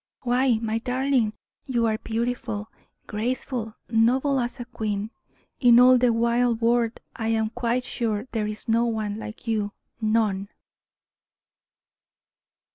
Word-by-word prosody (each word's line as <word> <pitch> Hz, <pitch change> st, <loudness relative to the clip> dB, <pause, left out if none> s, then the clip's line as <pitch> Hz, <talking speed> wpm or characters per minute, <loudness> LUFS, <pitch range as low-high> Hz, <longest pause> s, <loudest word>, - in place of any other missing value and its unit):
Why, 250 Hz, -1 st, +3 dB
my 225 Hz, 0 st, -1 dB
darling, 250 Hz, -2 st, +1 dB, 0.3 s
you 240 Hz, -3 st, +1 dB
are 220 Hz, -1 st, 0 dB
beautiful, 225 Hz, -2 st, -3 dB, 0.3 s
graceful, 230 Hz, 0 st, -3 dB
noble 255 Hz, +5 st, +3 dB
as 245 Hz, +1 st, -3 dB
a 245 Hz, -, -5 dB
queen. 215 Hz, -3 st, -3 dB, 0.5 s
In 240 Hz, -2 st, +7 dB
all 250 Hz, 0 st, +7 dB
the 245 Hz, -1 st, +4 dB
wide 235 Hz, 0 st, +2 dB
world 235 Hz, 0 st, +1 dB, 0.2 s
I 225 Hz, -, -3 dB
am 220 Hz, -1 st, +1 dB
quite 245 Hz, +1 st, -1 dB
sure 225 Hz, -3 st, -2 dB
there 215 Hz, -2 st, -1 dB
is 215 Hz, 0 st, -7 dB
no 230 Hz, +1 st, +3 dB
one 215 Hz, -2 st, -2 dB
like 220 Hz, 0 st, -8 dB
you 210 Hz, -2 st, -1 dB, 0.3 s
none." 215 Hz, -3 st, +1 dB
230 Hz, 125 wpm, -25 LUFS, 220-245 Hz, 0.5 s, In